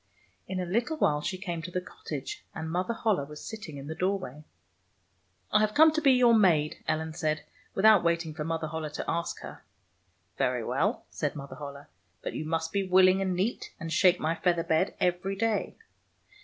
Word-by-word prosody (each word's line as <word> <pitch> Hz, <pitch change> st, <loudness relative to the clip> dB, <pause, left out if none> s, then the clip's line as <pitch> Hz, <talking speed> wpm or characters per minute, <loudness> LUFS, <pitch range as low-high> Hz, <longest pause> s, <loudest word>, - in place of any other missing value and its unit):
In 185 Hz, -, -3 dB
a 180 Hz, -, -1 dB
little 235 Hz, -, 0 dB
while 150 Hz, -, +2 dB
she 185 Hz, +4 st, -3 dB
came 175 Hz, -3 st, -4 dB
to 170 Hz, -, -6 dB
the 180 Hz, -, -1 dB
cottage, 150 Hz, -5 st, -7 dB
and 160 Hz, 0 st, -4 dB
Mother 185 Hz, +7 st, -1 dB
HoUe 210 Hz, -11 st, 0 dB
was 150 Hz, 0 st, -10 dB
sitting 210 Hz, -10 st, -7 dB
in 135 Hz, -, -8 dB
the 155 Hz, -, -4 dB
door 185 Hz, +4 st, 0 dB
way. 150 Hz, -5 st, -9 dB, 1.1 s
"I 210 Hz, -, +5 dB
have 215 Hz, 0 st, +1 dB
come 315 Hz, +1 st, +8 dB
to 315 Hz, +1 st, -1 dB
be 275 Hz, -3 st, +6 dB
your 245 Hz, -2 st, +5 dB
maid," 170 Hz, -9 st, +3 dB
Ellen 160 Hz, 0 st, -1 dB
said, 155 Hz, -2 st, -1 dB, 0.3 s
without 210 Hz, -1 st, +6 dB
waiting 170 Hz, -1 st, 0 dB
for 150 Hz, 0 st, -4 dB
Mother 160 Hz, 0 st, -2 dB
HoUe 160 Hz, -1 st, -4 dB
to -, -, -4 dB
ask 170 Hz, 0 st, -2 dB
her. -, -, -9 dB, 0.4 s
" -, -, -42 dB
Very -, -, +1 dB
well," -, -, 0 dB
said -, -, -2 dB
Mother 140 Hz, -1 st, -8 dB
HoUe, 140 Hz, -1 st, -8 dB, 0.2 s
'' -, -, -42 dB
but -, -, -4 dB
you 155 Hz, -, -4 dB
must 165 Hz, 0 st, -1 dB
be 195 Hz, -2 st, -1 dB
wiUing 185 Hz, +1 st, +6 dB
and 190 Hz, -2 st, 0 dB
neat, 195 Hz, +7 st, -2 dB
and 165 Hz, -3 st, -4 dB
shake 180 Hz, +1 st, +5 dB
my 160 Hz, +1 st, 0 dB
feather 170 Hz, 0 st, +1 dB
bed 165 Hz, +2 st, +1 dB
ever}^ 180 Hz, +2 st, 0 dB
day." 220 Hz, -1 st, 0 dB
175 Hz, 205 wpm, -29 LUFS, 160-195 Hz, 1.1 s, come